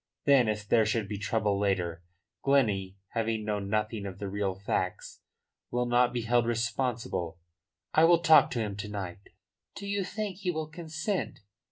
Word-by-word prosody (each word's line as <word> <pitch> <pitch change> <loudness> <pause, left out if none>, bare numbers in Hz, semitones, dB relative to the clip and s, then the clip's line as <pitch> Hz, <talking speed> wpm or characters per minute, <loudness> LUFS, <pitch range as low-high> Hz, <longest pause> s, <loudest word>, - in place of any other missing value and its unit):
Then 140 -5 +5
if 105 0 -3
there 115 +1 +5
should 110 -1 0
be 100 -1 -4
trouble 105 -1 0
later, 90 -4 0 0.4
Glennie, 105 -9 +2
having 115 -1 -1
known 105 -2 -2
nothing 105 -1 -1
of 95 -1 -7
the 100 - -4
real 100 -1 -1
facts, 95 0 -3 0.5
will 125 0 0
not 120 0 +3
be 120 -2 -2
held 120 +1 +2
responsible. 115 -7 -1 0.6
I 160 - +6
will 170 +1 +6
talk 160 -2 +7
to 120 - -2
him 105 -3 -2
to 105 +1 -5
night." 95 -4 -5 0.6
"Do 200 - -7
you 200 0 -1
think 200 0 -4
he 190 -2 -3
will 160 -3 -2
consent?" 165 +4 -3
110 Hz, 170 wpm, -29 LUFS, 100-135 Hz, 0.6 s, talk